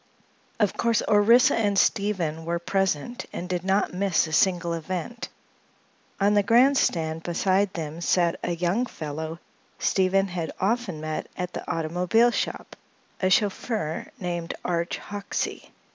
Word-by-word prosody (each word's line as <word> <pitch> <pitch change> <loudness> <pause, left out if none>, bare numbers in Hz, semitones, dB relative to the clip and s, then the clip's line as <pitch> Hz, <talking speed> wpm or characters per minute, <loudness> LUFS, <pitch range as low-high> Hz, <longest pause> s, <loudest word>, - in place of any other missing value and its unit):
Of 210 -3 +2
course, 230 -2 +1
Orissa 235 +6 +5
and 205 -3 +1
Stephen 180 -5 +1
were 170 +1 -1
present 195 +4 -1
and 180 - -5
did 180 -1 -2
not 190 0 +1
miss 185 -2 +2
a 155 - -7
single 175 +1 +2
event. 180 +7 -4 0.9
On 200 +1 +3
the 205 - +5
grand 245 +7 +5
stand 160 -1 0
beside 190 +3 +1
them 160 0 -5
sat 170 0 +2
a 175 - -1
young 180 +9 0
fellow 160 -1 -5 0.4
Stephen 195 +1 +2
had 175 -3 -3
often 195 -5 -1
met 155 0 -4
at 180 -1 -4
the - - -5
automobile 180 +9 +2
shop, - - -3 0.5
a 185 - +3
chauffeur 200 -4 0
named 175 -2 -3
Arch 170 -1 -1
Hoxsey. 205 0 -5
185 Hz, 140 wpm, -25 LUFS, 170-205 Hz, 0.9 s, Orissa